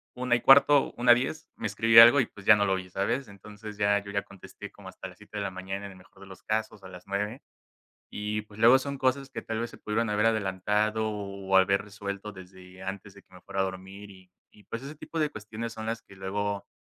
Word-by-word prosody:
1:15, 135 Hz, +3 st, +5 dB
1:10, 125 Hz, +5 st, +2 dB
me -, -, -7 dB
escribe 115 Hz, +2 st, +6 dB
algo 120 Hz, +5 st, +9 dB
y 120 Hz, -, +2 dB
pues 100 Hz, 0 st, -15 dB
ya 105 Hz, -, +8 dB
no 100 Hz, -, +1 dB
lo 95 Hz, -, +1 dB
oí, 95 Hz, -1 st, -4 dB
¿sabes? 115 Hz, +7 st, -1 dB
Entonces 105 Hz, +1 st, -11 dB
ya 100 Hz, -1 st, +3 dB
yo 100 Hz, -, -8 dB
ya 100 Hz, 0 st, 0 dB
contesté 100 Hz, -2 st, -12 dB
como -, -, -12 dB
hasta -, -, -9 dB
las -, -, -14 dB
7:00 105 Hz, -, -11 dB
de 100 Hz, -, -2 dB
la 100 Hz, -, -2 dB
mañana 95 Hz, +2 st, -6 dB
en -, -, -11 dB
el 95 Hz, -, -16 dB
mejor 95 Hz, +1 st, -20 dB
de 100 Hz, -, -12 dB
los 95 Hz, -, -13 dB
casos, 110 Hz, -2 st, -3 dB
a -, -, -9 dB
las 90 Hz, 0 st, -13 dB
9:00 105 Hz, +6 st, -3 dB, 0.7 s
y 105 Hz, +1 st, -3 dB
pues 105 Hz, 0 st, -15 dB
luego 120 Hz, +3 st, +7 dB
son 140 Hz, 0 st, -5 dB
cosas 130 Hz, +1 st, 0 dB
que -, -, -5 dB
tal 115 Hz, 0 st, -4 dB
vez 120 Hz, -, -3 dB
se -, -, -14 dB
pudieron 110 Hz, +1 st, -1 dB
haber 105 Hz, +2 st, +2 dB
adelantado 105 Hz, +1 st, 0 dB
o 100 Hz, -2 st, -2 dB
haber 100 Hz, +1 st, +4 dB
resuelto 100 Hz, 0 st, -7 dB
desde 95 Hz, -1 st, -14 dB
antes 95 Hz, +1 st, -7 dB
de 100 Hz, -, -16 dB
que -, -, -36 dB
me 90 Hz, -, -14 dB
fuera 95 Hz, -, -4 dB
a -, -, +4 dB
dormir 95 Hz, +2 st, -8 dB
y 95 Hz, -1 st, -17 dB, 0.3 s
y 105 Hz, -, -19 dB
pues 115 Hz, -, -6 dB
ese 140 Hz, +3 st, -8 dB
tipo 165 Hz, -, -7 dB
de 155 Hz, -2 st, +1 dB
cuestiones 110 Hz, +2 st, -7 dB
son 110 Hz, 0 st, -7 dB
las 115 Hz, 0 st, -3 dB
que 100 Hz, -, -17 dB
luego 100 Hz, +1 st, -3 dB
105 Hz, 240 wpm, -28 LUFS, 95-115 Hz, 0.7 s, algo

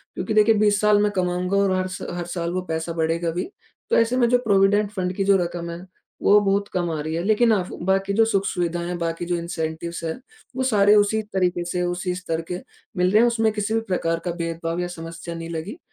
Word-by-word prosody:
क्योंकि 220 Hz, -, -3 dB
देखिए, 215 Hz, +1 st, +5 dB
20 205 Hz, -1 st, +3 dB
साल 210 Hz, -1 st, +4 dB
मैं 210 Hz, -, +2 dB
कमाऊँगा 180 Hz, 0 st, 0 dB
और 200 Hz, -1 st, +3 dB
हर 185 Hz, 0 st, -1 dB
स 185 Hz, -, -6 dB
हर 175 Hz, -, -3 dB
साल 170 Hz, -1 st, -2 dB
वो 185 Hz, -, -1 dB
पैसा 160 Hz, +1 st, -2 dB
बढ़ेगा 165 Hz, +1 st, 0 dB
भी, 180 Hz, -, -3 dB, 0.4 s
तो -, -, +3 dB
ऐसे 230 Hz, +2 st, +2 dB
में 240 Hz, -2 st, +4 dB
जो 245 Hz, -, +5 dB
प्रोविडेंट 200 Hz, 0 st, +3 dB
फण्ड 185 Hz, -3 st, -2 dB
की 195 Hz, -, 0 dB
जो 195 Hz, 0 st, +4 dB
रकम 170 Hz, 0 st, -5 dB
है, 170 Hz, +2 st, -7 dB, 0.4 s
वो 205 Hz, +1 st, +6 dB
बहुत 200 Hz, 0 st, +1 dB
कम 175 Hz, -1 st, 0 dB
आ 155 Hz, -, -3 dB
रही 155 Hz, +1 st, -4 dB
है। 165 Hz, -, -1 dB
लेकिन 220 Hz, +3 st, +3 dB
आफ़ 185 Hz, -3 st, -1 dB
बाकी 195 Hz, +1 st, +1 dB
जो 225 Hz, +2 st, +4 dB
सुख-सुविधाएँ 175 Hz, -5 st, -1 dB
हैं, 175 Hz, 0 st, -3 dB
बाकी 165 Hz, 0 st, -3 dB
जो 175 Hz, 0 st, -1 dB
इंसेंटिव्स 170 Hz, 0 st, -4 dB
हैं, 160 Hz, -1 st, -2 dB, 0.4 s
वो 260 Hz, -, -1 dB
सारे 210 Hz, -5 st, +4 dB
उसी 210 Hz, +1 st, +3 dB
तरीके 180 Hz, -2 st, +1 dB
से, 180 Hz, +1 st, -2 dB
उसी 175 Hz, +1 st, -2 dB
स्तर 165 Hz, -3 st, -3 dB
के 180 Hz, -, -3 dB, 0.4 s
मिल 180 Hz, 0 st, +3 dB
रहे 210 Hz, -, +5 dB
हैं, 240 Hz, -, +5 dB
उसमें 225 Hz, -2 st, +2 dB
किसी 210 Hz, +1 st, -2 dB
भी 225 Hz, -, +2 dB
प्रकार 165 Hz, -3 st, 0 dB
का 175 Hz, -, 0 dB
भेदभाव 165 Hz, 0 st, -3 dB
या 180 Hz, -, -1 dB
समस्या 165 Hz, 0 st, -7 dB
नहीं 165 Hz, 0 st, -6 dB
लगी। 170 Hz, -, -5 dB
180 Hz, 235 wpm, -23 LUFS, 170-205 Hz, 0.4 s, वो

